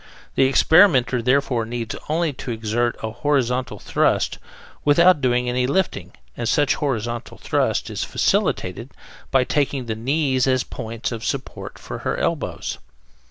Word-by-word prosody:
The 135 - +4
experimenter, 135 -5 +5
therefore, 125 -1 +1
needs 115 0 -4
only 160 -1 0
to 130 - -8
exert 115 +1 -1
a 110 - -2
horizontal 130 -2 0
thrust, - - 0 0.4
without 170 +2 +5
doing 125 -1 +1
any 125 +1 +1
lifting, 135 - -1 0.2
and 115 - -2
such 145 +1 +3
horizontal 120 -5 -3
thrust - - 0
is - - -3
facilitated 115 +8 -1 0.4
by 135 -1 +3
taking 140 -1 -1
the 110 - -2
knees 130 +2 0
as 130 -1 +2
points 115 -1 -5
of 115 -1 -5
support 135 +1 -5
for - - -7
her - - -2
elbows. - - -2
125 Hz, 140 wpm, -22 LUFS, 115-140 Hz, 0.4 s, experimenter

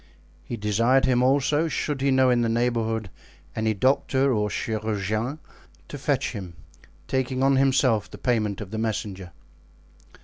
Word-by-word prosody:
He 120 - -6
desired 115 +6 +2
him 125 -1 +2
also, 140 +4 +2
should 150 -3 -2
he 140 - +2
know 130 -1 +4
in 120 -1 +2
the 115 - +1
neighborhood 115 -3 -1 0.4
any 110 0 0
doctor 135 +3 +2
or 105 -2 0
chirurgeon, 110 +4 -2 0.5
to 145 - -6
fetch 135 0 0
him, 95 -7 -7 0.5
taking 130 0 -1
on 135 0 +4
himself 130 -5 +2
the - - -10
payment 110 -5 -1
of 100 -2 -8
the 110 - -3
messenger. 100 -5 -3
120 Hz, 145 wpm, -25 LUFS, 110-135 Hz, 0.5 s, know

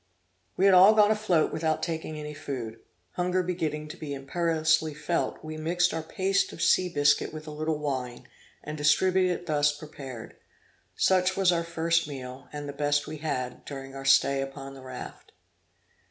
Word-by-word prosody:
We 190 - +3
had 195 - +6
all 190 +4 +8
gone 210 0 +5
afloat 210 -7 +1
without 155 0 -1
taking 160 -2 -3
any 150 0 -6
food. 125 -6 -6 0.3
Hunger 180 +1 0
beginning 155 -4 -3
to - - -8
be 145 -2 -5
imperiously 155 +1 +1
felt, 170 +3 -2
we 155 0 -6
mixed 175 +3 +1
our 160 - -2
paste 195 +4 0
of - - -11
sea 185 -1 +3
biscuit 145 -3 +2
with 155 0 -8
a 155 - -7
little 155 +1 -2
wine, 130 -5 -4 0.4
and 150 - -5
distributed 180 +5 +3
it - - -14
thus 150 -2 +2
prepared. 135 -6 -9 0.6
Such 185 0 +2
was 190 -2 +4
our 170 -1 0
first 170 -1 0
meal, 130 -2 -8
and 145 -1 -6
the 140 - -5
best 145 0 +1
we 155 - -7
had, 130 -5 -4
during 135 -1 -8
our 135 0 -7
stay 135 0 +4
upon 135 0 -7
the 135 - -11
raft. 130 - -9
155 Hz, 175 wpm, -27 LUFS, 140-175 Hz, 0.6 s, all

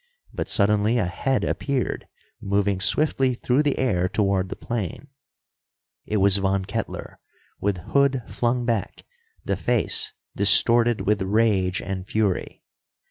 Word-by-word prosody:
But - - -4
suddenly 105 +3 +2
a 105 - +1
head 130 +8 -1
appeared, 140 -3 -2 0.3
moving 100 -1 0
swiftly 130 +4 +2
through 125 +4 +1
the 145 -2 0
air 90 -9 0
toward 95 -2 0
the - - -5
plane. 115 - -5 1.0
It 105 - -1
was 100 0 +5
Von 95 -1 0
Kettler, 115 +3 -5 0.4
with 100 -2 -1 0.2
hood 140 -3 +2
flung 120 0 -1
back, 115 -4 -2 0.4
the - - 0
face 435 -1 +1 0.2
distorted 115 +3 +3
with 100 +1 0
rage 95 -2 +1
and 95 -1 -5
fury. 105 -5 -2
105 Hz, 130 wpm, -23 LUFS, 95-120 Hz, 1.0 s, was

